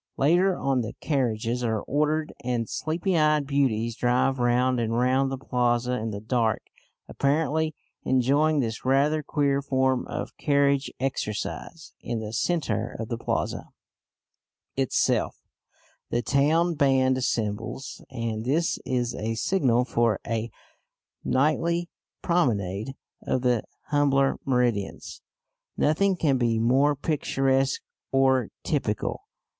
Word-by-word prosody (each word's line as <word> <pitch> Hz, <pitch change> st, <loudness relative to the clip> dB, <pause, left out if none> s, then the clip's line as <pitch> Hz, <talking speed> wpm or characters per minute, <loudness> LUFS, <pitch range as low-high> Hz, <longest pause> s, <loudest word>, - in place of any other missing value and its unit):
Later 175 Hz, +6 st, +3 dB
on 135 Hz, -2 st, +1 dB
the 110 Hz, 0 st, -5 dB
carriages 125 Hz, -4 st, -1 dB
are 110 Hz, -3 st, 0 dB
ordered, 150 Hz, +2 st, 0 dB
and 120 Hz, -2 st, -1 dB
sleepy 170 Hz, -, -1 dB
eyed 150 Hz, -2 st, +3 dB
beauties 120 Hz, -5 st, 0 dB
drive 125 Hz, +2 st, +1 dB
round 125 Hz, +1 st, +2 dB
and 115 Hz, 0 st, -1 dB
round 130 Hz, +2 st, +2 dB
the 135 Hz, -, -3 dB
plaza 125 Hz, -1 st, 0 dB
in 110 Hz, +1 st, -3 dB
the 100 Hz, -2 st, -5 dB
dark, 110 Hz, 0 st, 0 dB, 0.4 s
apparently 155 Hz, +2 st, 0 dB, 0.3 s
enjoying 140 Hz, +4 st, +2 dB
this 115 Hz, -3 st, -3 dB
rather 140 Hz, +4 st, +2 dB
queer 140 Hz, -1 st, 0 dB
form 130 Hz, -2 st, +1 dB
of -, -, -5 dB
carriage 140 Hz, -2 st, +2 dB
exercise. 135 Hz, +5 st, -4 dB
In 120 Hz, -, -3 dB
the 110 Hz, 0 st, -6 dB
centre 140 Hz, -, -1 dB
of 115 Hz, -, -4 dB
the 115 Hz, -, -2 dB
plaza -, -, -2 dB, 1.1 s
itself 135 Hz, -1 st, +1 dB, 0.7 s
the 120 Hz, -, 0 dB
town 155 Hz, +7 st, +2 dB
band 135 Hz, -3 st, +3 dB
assembles, 115 Hz, +1 st, -3 dB
and 115 Hz, -2 st, -3 dB
this 155 Hz, +7 st, 0 dB
is 125 Hz, -2 st, -1 dB
a 115 Hz, +1 st, -3 dB
signal 125 Hz, -3 st, +2 dB
for 115 Hz, -3 st, +1 dB
a 115 Hz, 0 st, -2 dB, 0.7 s
nightly 165 Hz, +6 st, +1 dB, 0.3 s
promenade 110 Hz, -, 0 dB, 0.3 s
of 130 Hz, -, -1 dB
the 125 Hz, -3 st, +1 dB, 0.2 s
humbler 140 Hz, -2 st, +2 dB
Meridians. 120 Hz, -6 st, -1 dB, 0.6 s
Nothing 190 Hz, +6 st, +2 dB
can 145 Hz, -7 st, +1 dB
be 115 Hz, -2 st, +1 dB
more 135 Hz, +6 st, +3 dB
picturesque 135 Hz, -2 st, 0 dB, 0.3 s
or 130 Hz, -3 st, +3 dB
typical. 125 Hz, -, -2 dB
130 Hz, 120 wpm, -26 LUFS, 120-145 Hz, 1.1 s, Later